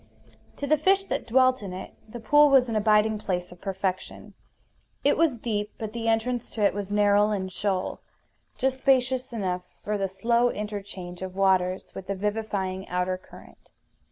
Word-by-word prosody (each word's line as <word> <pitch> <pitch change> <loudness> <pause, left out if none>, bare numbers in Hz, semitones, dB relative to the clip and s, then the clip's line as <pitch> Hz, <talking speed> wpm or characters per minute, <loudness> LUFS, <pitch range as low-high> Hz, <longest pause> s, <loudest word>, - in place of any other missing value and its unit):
To 285 - -4
the 305 +1 +3
fish 390 +5 +3
that - - -3
dwelt 255 +1 +4
in 195 -3 -6
it 185 - -8 0.2
the 240 - -7
pool 295 +6 +5
was 265 -2 +5
an 225 - -3
abiding 215 0 +3
place 180 -4 -3
of 180 - -14
perfection. 190 -1 -4 0.7
It 285 - +4
was 310 -6 +2
deep; 210 -2 -3
but 220 -1 -5
the 230 -1 -3
entrance 230 +2 0
to 215 - -1
it 200 - +4
was 200 0 -5
narrow 205 0 +4
and 190 -3 -2
shoal, 190 -1 -2 0.6
just 265 0 0
spacious 260 -1 +2
enough 185 -6 -2 0.2
for 210 0 -2
the 195 -1 -1
slow 235 +5 +2
interchange 200 -5 -6
of 190 0 -6
waters 190 -1 +1
with 190 - -8
the 200 - -2
vivifying 200 -2 -2
outer 180 +1 0
current. - - -16
210 Hz, 175 wpm, -26 LUFS, 190-240 Hz, 0.7 s, pool